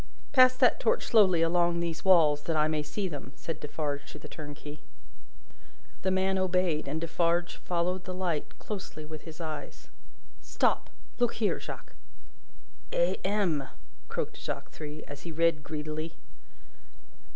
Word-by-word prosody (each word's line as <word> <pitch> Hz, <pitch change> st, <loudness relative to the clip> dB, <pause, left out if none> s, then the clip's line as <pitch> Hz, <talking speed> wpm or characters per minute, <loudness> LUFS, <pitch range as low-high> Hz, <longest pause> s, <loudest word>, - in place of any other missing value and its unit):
"Pass 255 Hz, -1 st, +7 dB
that -, -, +4 dB
torch 480 Hz, -, +2 dB
slowly 185 Hz, -7 st, +5 dB
along 170 Hz, 0 st, +3 dB
these 170 Hz, -1 st, -2 dB
walls, 160 Hz, -6 st, +6 dB
that 165 Hz, -, 0 dB
I 155 Hz, 0 st, +4 dB
may 155 Hz, -1 st, 0 dB
see 190 Hz, +6 st, -2 dB
them," 140 Hz, -5 st, -7 dB
said 165 Hz, -, -5 dB
Defarge 145 Hz, -1 st, -3 dB
to -, -, -8 dB
the 150 Hz, -, -10 dB
turnkey. 145 Hz, 0 st, -8 dB, 1.2 s
The 190 Hz, -, +1 dB
man 190 Hz, 0 st, +2 dB
obeyed, 180 Hz, -5 st, +1 dB
and 150 Hz, +3 st, -1 dB
Defarge 170 Hz, +1 st, +1 dB
followed 180 Hz, +1 st, -1 dB
the 185 Hz, -, -4 dB
light 175 Hz, -5 st, -2 dB
closely 185 Hz, -7 st, -6 dB
with 155 Hz, -1 st, -8 dB
his 160 Hz, 0 st, -9 dB
eyes. 155 Hz, -2 st, -6 dB, 0.5 s
"Stop! -, -, +1 dB, 0.3 s
Look 240 Hz, -1 st, +2 dB
here, 215 Hz, -2 st, +1 dB
Jacques!" -, -, -8 dB, 1.0 s
"A. -, -, +2 dB
M.!" 185 Hz, -9 st, +1 dB, 0.4 s
croaked -, -, -3 dB
Jacques -, -, -5 dB
Three, 155 Hz, 0 st, -7 dB
as 145 Hz, -1 st, -9 dB
he 170 Hz, -, -6 dB
read 165 Hz, -1 st, +3 dB
greedily. 155 Hz, +1 st, -4 dB
165 Hz, 145 wpm, -30 LUFS, 155-185 Hz, 1.2 s, Pass